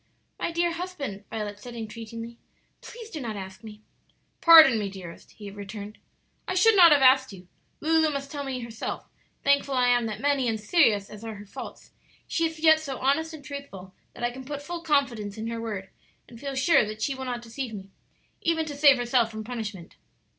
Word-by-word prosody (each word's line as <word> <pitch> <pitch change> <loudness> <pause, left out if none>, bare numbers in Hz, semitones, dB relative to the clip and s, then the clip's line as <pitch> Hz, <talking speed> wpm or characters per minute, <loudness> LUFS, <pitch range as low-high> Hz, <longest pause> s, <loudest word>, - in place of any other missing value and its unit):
"My - - -2
dear 340 +1 +1
husband," 335 - -6
Violet 210 -2 -5
said, 240 +2 -10
entreatingly, 230 +1 -8 0.4
"please 460 -2 -11
do 310 - -5
not 225 -4 -4
ask 190 +1 -8
me." 215 -1 -11 0.6
"Pardon 315 -8 +9
me, 205 -2 -2
dearest," 185 -3 -11
he 205 -2 -9
returned. 205 +1 -8 0.5
"I 370 - -2
should 445 +4 +5
not 345 -4 +8
have 285 -2 +5
asked 260 0 +5
you; 185 -2 -12 0.3
Lulu 320 0 +3
must 280 -1 -5
tell 290 -2 -4
me 265 -2 -4
herself; 230 -1 -5 0.4
thankful 280 -1 +2
I 250 -1 +3
am 245 -2 +3
that 215 -1 -5
many 280 -2 +1
and 220 -1 -1
serious 210 - +2
as 210 +1 -10
are 225 -1 -6
her 205 0 -11
faults, 200 - -10 0.3
she 330 -1 0
is 320 0 -9
yet 315 0 +6
so 275 -4 -5
honest 285 +5 +1
and 290 -2 -13
truthful 200 -10 -9 0.2
that 240 - -8
I 240 - +1
can 260 +2 -9
put 285 +1 -6
full 345 +2 -5
confidence 260 -10 0
in 220 - -5
her 230 0 -4
word 205 -4 -5 0.4
and 235 - -13
feel 275 0 -5
sure 265 +3 +4
that 215 0 -5
she 275 - 0
will 265 0 -6
not 245 -1 -4
deceive 240 +1 -5
me, 195 -1 -10 0.5
even 325 -1 +1
to 295 -2 -6
save 285 -2 +6
herself 240 -1 +2
from 220 -1 -7
punishment." 215 -6 -7
245 Hz, 205 wpm, -26 LUFS, 215-290 Hz, 0.6 s, Pardon